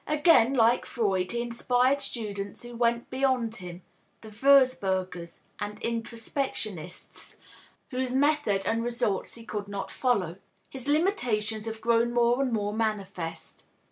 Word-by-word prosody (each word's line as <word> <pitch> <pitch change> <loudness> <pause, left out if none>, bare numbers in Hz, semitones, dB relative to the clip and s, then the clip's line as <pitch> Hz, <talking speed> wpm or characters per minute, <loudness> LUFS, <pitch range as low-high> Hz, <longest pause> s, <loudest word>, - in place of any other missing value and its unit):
Again, 295 -5 +4
like 235 0 +3
Freud, 190 -5 0
he 235 0 -1
inspired 250 +3 +1
students 205 -3 -5
who 240 0 -9
went 235 0 0
beyond 255 -3 0
him 180 -2 -9 0.4
(the 220 - -10
Wurzburgers 195 -9 +2 0.2
and 210 +1 -5
introspectionists) 230 - -4 0.6
whose 255 0 -1
method 285 -8 +2
and 230 +1 0
results 235 -5 -1
he 230 -1 -11
could 205 -2 -4
not 200 -1 -5
follow. 195 -10 0 0.3
His 265 0 -8
limitations 235 - +1
have 220 0 -5
grown 235 +1 +2
more 240 +2 +3
and 265 -2 0
more 205 -2 -1
manifest. 195 -7 -4
230 Hz, 130 wpm, -28 LUFS, 205-250 Hz, 0.6 s, Again